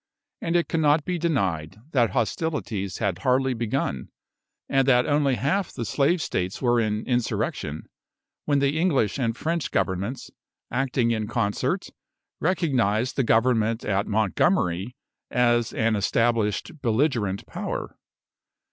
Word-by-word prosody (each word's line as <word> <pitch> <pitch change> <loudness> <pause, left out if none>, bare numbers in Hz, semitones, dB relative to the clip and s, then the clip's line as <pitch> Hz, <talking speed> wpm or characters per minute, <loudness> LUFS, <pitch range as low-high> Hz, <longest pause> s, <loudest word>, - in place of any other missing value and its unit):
And 165 - -1
it 170 - +2
cannot 150 -1 +2
be 180 -1 -2
denied 95 - -1
that 120 -6 +3
hostilities 115 - -2
had 100 -5 -1
hardly 130 +3 +2
begun, 115 - -2 0.6
and 135 -1 +2
that 125 -2 +5
only 145 -2 +2
half 150 - 0
the 120 - -5
Slave 145 +6 +1
States 90 +1 -2
were 120 -2 +2
in 110 -1 -1
insurrection, 115 - -1 0.6
when 145 -1 +2
the 140 +2 +1
English 145 - +1
and 115 -2 -1
French 165 0 -1
Governments, 100 +7 -2 0.4
acting 125 -2 +1
in 110 -2 -1
concert, 105 -3 -1 0.5
recognised 130 - +1
the 135 - +2
government 115 -1 +2
at 100 0 0
Montgomery 105 - +1 0.3
as 120 -2 +2
an 115 -1 +1
established 115 +5 0
belligerent 115 -5 0
power. - - -5
120 Hz, 125 wpm, -25 LUFS, 105-140 Hz, 0.6 s, that